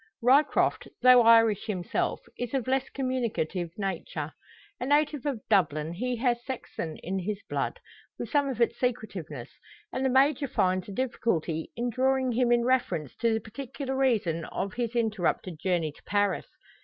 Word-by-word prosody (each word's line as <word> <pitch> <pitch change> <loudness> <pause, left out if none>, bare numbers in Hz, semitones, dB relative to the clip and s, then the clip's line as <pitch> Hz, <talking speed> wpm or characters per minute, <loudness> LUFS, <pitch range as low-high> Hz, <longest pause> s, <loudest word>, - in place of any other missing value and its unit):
Ryecroft, 270 +5 +3 0.2
though 255 -1 +8
Irish 225 -2 +5
himself, 185 -5 -1
is 245 +2 -4
of 260 -4 0
less 265 0 +1
communicative 235 - -2
nature. 170 -6 -3 0.5
A 250 - -3
native 295 -1 +2
of 260 -6 -3
Dublin, 165 -6 +2
he 250 +7 -2
has 240 0 0
Saxon 230 - -5
in 190 +2 -2
his 200 +2 -3
blood, - - -2 0.4
with - - -4
some 285 -2 +2
of 250 -4 -4
its 235 - +1
secretiveness; 185 - -3 0.4
and 260 - -1
the 265 - +3
Major 275 +2 +3
finds 185 -4 0
a - - -5
difficulty 195 -9 -1
in 240 +1 -1
drawing 260 +1 +1
him 240 0 +2
in 240 0 +3
reference 185 - 0
to 230 -1 +2
the 220 - +1
particular 265 +4 -6
reason 215 -11 +1
of 195 0 -4
his 240 -1 -3
interrupted 195 -7 0
journey 170 -3 0
to - - -20
Paris. 205 -1 0
230 Hz, 160 wpm, -28 LUFS, 185-255 Hz, 0.5 s, though